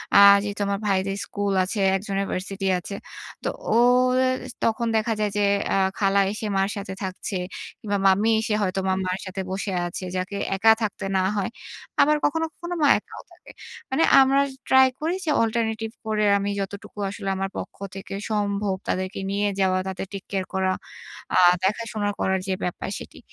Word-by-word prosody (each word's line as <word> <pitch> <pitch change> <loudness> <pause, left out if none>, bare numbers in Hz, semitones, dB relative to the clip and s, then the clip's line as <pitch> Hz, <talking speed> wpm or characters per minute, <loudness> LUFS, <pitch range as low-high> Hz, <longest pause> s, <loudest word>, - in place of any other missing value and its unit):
আ - - +9 0.3
যেহেতু 205 0 -4
আমার 200 0 -1
ভাইদের 195 0 0
স্কুল 205 -1 -2
আছে, 205 +3 -3 0.2
একজনের 195 0 -2
ভার্সিটি 195 +1 -3
আছে। 200 +3 -7 0.5
তো - - -1 0.3
ও - - +3 0.5
এস 255 0 -1
তখন 230 +1 +1
দেখা 220 +1 +1
যায় 210 -1 +1 0.4
অ্যা - - +2 0.2
খালা 200 -1 +3
এসে 215 +1 -5
মার 195 +1 +2
সাথে 195 -1 -5
থাকছে, 190 +2 -4 0.4
কিংবা 205 -4 -1
মামী 200 +4 +4
এসে 220 -1 -1
হয়তো 195 -1 0
মা 190 - +2
মায়ের 185 +1 -2
সাথে 190 +1 -4
বসে 195 +1 -3 0.2
আছে, 175 - -6
যাকে 185 +2 -3 0.2
একা 220 +4 +6
থাকতে 205 -2 -2
না 185 - +2
হয়। 195 - 0 0.5
আবার 300 +1 +5
কখনো, 325 +2 +1
কখনো 345 +1 -6
মা - - +6
একাও - - -12
থাকে। - - -16 0.4
মানে 270 +5 +3 0.2
আমরা 270 +1 +4 0.3
ট্রাই 265 0 +7
করি 325 +4 -1
যে 310 - +1
অল্টারনেটিভ 225 -1 -1 0.2
করে 215 -1 +1
আমি, 200 0 -2
যতটুকু 200 +1 -6
আসলে 195 0 -5
আমার 195 0 -2
পক্ষ - - -6 0.2
থেকে 195 0 -7 0.2
সম্ভব 200 -2 0
তাদেরকে 185 +1 -2
নিয়ে 205 +1 +1
যাওয়া, 185 -1 +2
তাদের 190 0 -4
টেক 195 -1 -5
কেয়ার 190 -2 -1
করা। 190 0 +1 0.6
আ - - +4 0.3
দেখাশোনা 210 +1 -1
করার 190 0 +1
যে 190 - 0
ব্যাপার 180 - -3
সেটি। - - -11
200 Hz, 175 wpm, -24 LUFS, 190-220 Hz, 0.6 s, আ